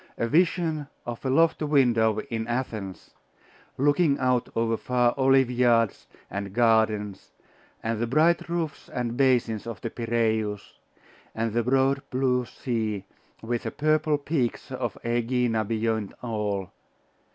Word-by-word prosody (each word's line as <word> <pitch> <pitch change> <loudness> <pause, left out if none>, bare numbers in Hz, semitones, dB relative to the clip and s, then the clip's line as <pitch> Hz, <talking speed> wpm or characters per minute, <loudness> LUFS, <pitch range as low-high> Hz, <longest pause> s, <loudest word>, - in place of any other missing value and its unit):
A 115 - 0
vision 160 0 +1 0.2
of 120 -1 -6
a 135 - -1
lofty 160 +3 +3
window 120 -7 +3
in 110 -1 -2
Athens, 110 -6 -4 0.7
looking 145 +1 +3
out 125 -2 +1
over 115 0 +1
far 120 +1 +1
olive 135 -1 +4
yards 120 -3 +2 0.2
and 100 -1 -5
gardens, 110 -3 +1 0.5
and 115 -1 -1
the 120 - 0
bright 160 +7 +2
roofs 165 -4 -3
and 120 -1 -3
basins 120 -5 +1
of 115 -5 -6
the 115 - -4
Piraeus, 110 -3 -1 0.6
and 115 -1 -1
the 120 - +2
broad 135 +3 +2
blue 125 -1 +1
sea, 110 -5 -3 0.4
with 120 +1 -2
the - - -3
purple 155 0 +1
peaks 140 -4 -2
of - - -3
Aegina 120 -1 0
beyond 110 -1 -1
all.... 105 -5 -2
120 Hz, 130 wpm, -26 LUFS, 110-135 Hz, 0.7 s, olive